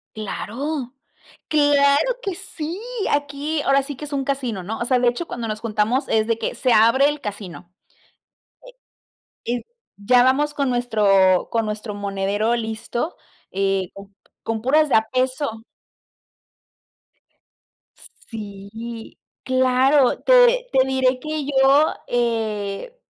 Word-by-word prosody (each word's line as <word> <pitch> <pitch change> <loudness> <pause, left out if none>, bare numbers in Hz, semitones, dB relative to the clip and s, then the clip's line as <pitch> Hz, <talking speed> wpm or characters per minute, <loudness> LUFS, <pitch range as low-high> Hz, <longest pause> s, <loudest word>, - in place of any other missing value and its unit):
¡Claro!, 245 +6 -4 0.6
¡claro 290 - +3
que 395 -6 -3
sí!, 345 -1 -6 0.3
aquí 290 +1 -1
ahora 275 0 +3
sí 285 +1 -6
que 300 - -7
es 290 - -10
un 275 -1 -1
casino, 255 -9 -3
¿no? 220 +5 -4
O - - 0
sea, 250 +1 +2
de 245 - +1
hecho 245 +8 -2
cuando 235 -1 -5
nos 215 -1 -4
juntamos 230 +4 0
es 220 -1 +2
de 230 -1 +1
que - - -3
se 255 -3 +1
abre 230 +6 +5
el 295 0 -3
casino, 195 -5 -8 1.7
e 235 - -2
y 240 - -6 0.3
ya 245 +5 +4
vamos 290 +4 +2
con 280 -2 0
nuestro 205 -6 +3
con 225 -1 0
nuestro 210 0 -5
monedero 200 +2 -1
listo, 230 +6 -4 0.3
eh, 195 -1 -1 0.5
con 225 -1 -3
puras 300 +4 +3
de - - 0
a 220 0 +1
peso. 255 -3 -1 2.7
Sí, 220 +2 -8 0.2
claro. 260 +1 +3
Te - - +4
te 260 0 +3
diré 260 -1 +1
que 310 0 -4
yo, 275 +2 +4
eh, 225 - -2
245 Hz, 130 wpm, -21 LUFS, 215-285 Hz, 2.7 s, abre